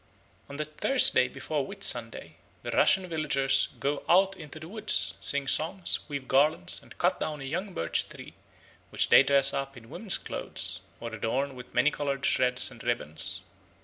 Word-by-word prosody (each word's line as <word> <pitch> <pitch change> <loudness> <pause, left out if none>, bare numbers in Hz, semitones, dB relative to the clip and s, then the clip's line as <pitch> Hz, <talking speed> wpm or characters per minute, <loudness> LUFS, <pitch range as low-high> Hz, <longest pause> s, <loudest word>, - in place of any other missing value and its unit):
On 140 - -8
the 155 - -2
Thursday 155 - +4
before 140 +3 -3
Whitsunday 130 - -1 0.3
the - - -4
Russian 190 -1 +3
villagers 140 -5 +1
"go 140 +1 -2
out 190 +2 +4
into 155 -3 -9
the 155 - -10
woods, 215 +3 -1
sing 140 -1 -1
songs, 170 +6 +1
weave 140 -3 -6
garlands, 135 - +2
and - - -16
cut - - +1
down 150 -1 -4
a - - -7
young 180 +8 -4
birch 85 - 0
tree, - - -12 0.6
which - - 0
they - - +8
dress 140 0 +4
up 135 -1 -4
in 115 -1 -14
woman's 195 +1 -1
clothes, - - -3 0.2
or 115 -1 -7
adorn 130 +6 -2
with 125 -1 -12
many 125 +5 +3
coloured 140 -2 -3
shreds 125 0 +2
and 120 - -12
ribbons. 80 -11 -3
140 Hz, 170 wpm, -28 LUFS, 130-160 Hz, 0.6 s, they